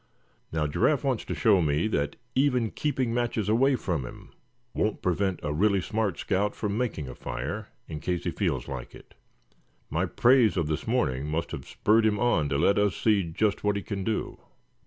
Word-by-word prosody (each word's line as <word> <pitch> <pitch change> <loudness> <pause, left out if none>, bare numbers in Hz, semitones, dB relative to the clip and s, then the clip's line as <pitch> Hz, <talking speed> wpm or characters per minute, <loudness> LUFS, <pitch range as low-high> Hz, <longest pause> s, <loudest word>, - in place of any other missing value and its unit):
Now, 80 -1 0
Giraffe 130 - +1
wants 130 -5 0
to - - -3
show 100 -5 +4
me 75 +4 +1
that 70 -8 -1 0.2
even 125 -5 +2
keeping 130 -5 -1
matches 120 -4 -1
away 130 +6 +4
from 85 - -2
him 60 - -10 0.4
won't 105 - -1
prevent 95 0 0
a 75 0 -1
really 100 +5 +3
smart 105 0 -1
scout 100 +1 0
from 105 -2 -2
making 110 - -2
a 65 - -7
fire, - - -5 0.2
in 75 - -6
case 90 +1 -2
he 85 - -1
feels 80 - -1
like - - -7
it. - - -16 0.8
My 85 +5 0
praise 120 +1 +4
of 85 - +1
this 75 +6 -3
morning 75 - 0
must 80 +2 -2
have - - -6
spurred 110 +1 +3
him 105 -1 +1
on 80 -12 +2
to 70 - 0
let 100 +7 +3
us 105 -3 +2
see 105 -3 +3
just 95 +5 -1
what 105 0 +2
he 100 - -3
can 100 -2 -4
do." 110 +2 -2
100 Hz, 195 wpm, -27 LUFS, 80-110 Hz, 0.8 s, show